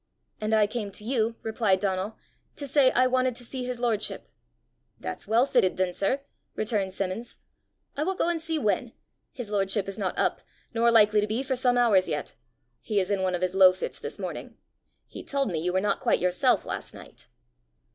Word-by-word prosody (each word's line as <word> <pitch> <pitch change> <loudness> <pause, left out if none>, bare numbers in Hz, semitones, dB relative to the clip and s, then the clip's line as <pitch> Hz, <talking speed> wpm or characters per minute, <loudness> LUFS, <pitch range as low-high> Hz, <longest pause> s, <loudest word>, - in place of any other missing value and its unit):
"And 215 +1 +1
I 215 -1 +5
came 210 -1 -4
to 210 - -6
you," 230 -1 0
replied 220 -4 +1
Donal, 195 +2 -2 0.4
"to 285 - -5
say 275 -1 +4
I 255 0 +3
wanted 255 -1 +1
to 245 - -5
see 255 +1 -4
his 250 -1 -3
lordship!" 235 -3 -1 0.7
"That's - - -5
well 230 +4 +4
fitted, 185 -9 +2
then, 185 -1 0
sir!" 230 +10 0 0.3
returned 205 -3 -1
Simmons. 195 +5 -4 0.6
"I 285 - -3
will 380 +3 -1
go 340 - 0
and 340 -2 0
see 325 0 -1
when. 220 -2 0 0.4
His 240 -5 -7
lordship 195 -1 +1
is 195 +2 -5
not 190 -3 -2
up, - - 0 0.3
nor 230 +1 +3
likely 215 -2 +5
to 210 - -1
be 225 +5 -1
for 265 -1 -1
some 250 -1 +2
hours 215 -6 +4
yet; 150 -1 -3 0.5
he 210 -2 0
is 190 +1 -1
in 200 -2 +1
one 185 -1 +1
of 180 - -3
his 185 0 0
low 190 -1 +7
fits 185 - -5
this - - -6
morning. - - -6 0.5
He - - -9
told 275 -6 0
me 165 - -1
you 175 +3 -1
were 185 - +2
not 200 +1 0
quite - - +2
yourself 180 0 +2
last - - -5
night." - - -12
215 Hz, 205 wpm, -27 LUFS, 190-245 Hz, 0.7 s, low